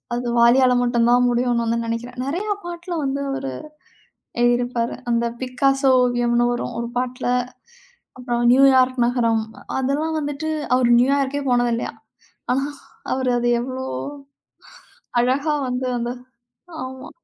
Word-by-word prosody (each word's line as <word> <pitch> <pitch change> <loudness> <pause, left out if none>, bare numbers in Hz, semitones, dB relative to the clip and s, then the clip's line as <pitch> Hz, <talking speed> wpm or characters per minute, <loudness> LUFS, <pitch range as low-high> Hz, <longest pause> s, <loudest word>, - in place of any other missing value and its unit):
அது 245 0 -3
வாலியால 250 +2 +5
மட்டுந்தான் 240 0 +3
முடியும்ன்னு 240 -1 +1
வந்து 230 +1 0
நெனைக்கிறேன். 240 +2 -5
நெறையா 375 +9 -1
பாட்டுல 345 0 -5
வந்து 275 0 -2
அவரு 135 - -4 0.9
எழுதியிருப்பாரு, 240 -1 +1 0.2
அந்தப் 235 0 0
'பிக்காசோ 270 +2 +2
ஓவியம்ன்னு' 240 -1 +2
வரும் 240 0 -4
ஒரு 235 0 -3
பாட்டுல. 250 0 -2 0.9
அப்புறம் 240 -1 -2
'நியூயார்க் 260 0 +5
நகரம்' 230 -3 +1 0.3
அதெல்லாம் 295 +5 -1
வந்துட்டு 290 +1 -3 0.3
அவரு 250 -1 +2
நியூயார்க்கே 275 +2 +1
போனது 245 -1 +2
இல்லையாம். 230 - -5 0.5
ஆனா 270 +2 +1 0.5
அவரு 260 -1 -1
அது 240 - 0
எவ்வளோ 260 +1 -5 1.4
அழகா 275 +5 +1
வந்து 250 +1 -2
அந்த 240 0 -2 0.7
ஆமா. 260 0 -8
250 Hz, 120 wpm, -21 LUFS, 240-270 Hz, 1.4 s, வாலியால